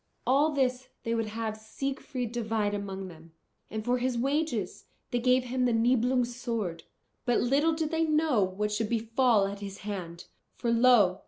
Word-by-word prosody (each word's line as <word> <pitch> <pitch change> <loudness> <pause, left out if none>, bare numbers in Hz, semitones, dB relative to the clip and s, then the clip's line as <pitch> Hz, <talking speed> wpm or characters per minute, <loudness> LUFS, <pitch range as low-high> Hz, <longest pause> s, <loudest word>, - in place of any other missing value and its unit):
All 285 +4 +4
this 260 -2 0
they 230 - -1
would 225 -1 0
have 220 0 -3
Siegfried 250 +2 -4
divide 220 -3 -1
among 195 -2 -4
them. 165 -2 -14 0.4
And 220 0 -5
for 245 +1 +1
his 250 -1 0
wages 270 - -1 0.3
they 245 - +1
gave 250 +1 +3
him 250 0 0
the 245 - +2
Nibelungs' 245 +1 +2
sword. 225 -9 -3 0.4
But 245 -2 +2
little 285 +6 +2
did 315 0 -2
they 325 0 +2
know 305 -7 +2
what 200 +3 -2
should 210 0 -1
befall 230 -1 +2
at 200 0 -5
his 200 -1 -7
hand. 175 -5 -5 0.3
For 235 - -1
lo! 230 -6 +5
235 Hz, 170 wpm, -29 LUFS, 210-255 Hz, 0.4 s, lo